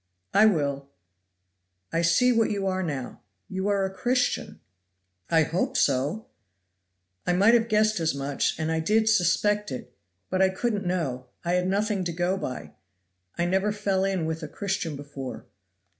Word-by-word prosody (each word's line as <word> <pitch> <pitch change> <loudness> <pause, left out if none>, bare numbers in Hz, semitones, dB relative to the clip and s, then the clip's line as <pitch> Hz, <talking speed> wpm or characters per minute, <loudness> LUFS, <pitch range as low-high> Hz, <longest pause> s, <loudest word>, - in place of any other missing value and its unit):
"I 215 +2 +7
will; 140 -7 0 1.0
I 165 - +2
see 210 +10 +4
what 230 -2 +3
you 200 -2 -2
are 190 0 0
now 140 -8 -4 0.3
you 190 +1 -3
are 200 -1 +2
a 190 - -4
Christian." 250 +5 0 0.7
"I 165 -1 +4
hope 170 +4 -1
so!" 145 +12 +1 1.0
"I 180 - +3
might 200 +6 +5
have 230 -1 +4
guessed 215 -2 +2
as 160 -3 0
much, 140 0 -1
and 160 0 -1
I 160 - +1
did 215 +7 +2
suspect 205 -1 +2
it; 125 -1 -7 0.4
but 185 0 +1
I 190 - +5
couldn't 205 0 -2
know, 140 -9 -2 0.2
I 175 - +1
had 180 0 +1
nothing 200 0 0
to 175 - -1
go 175 +3 0
by. 125 - -5 0.7
I 170 - +1
never 190 +4 +1
fell 200 -2 0
in 190 -4 0
with 160 +1 -3
a 155 - -5
Christian 190 -2 -3
before." 140 -2 -7
185 Hz, 165 wpm, -26 LUFS, 160-205 Hz, 1.0 s, I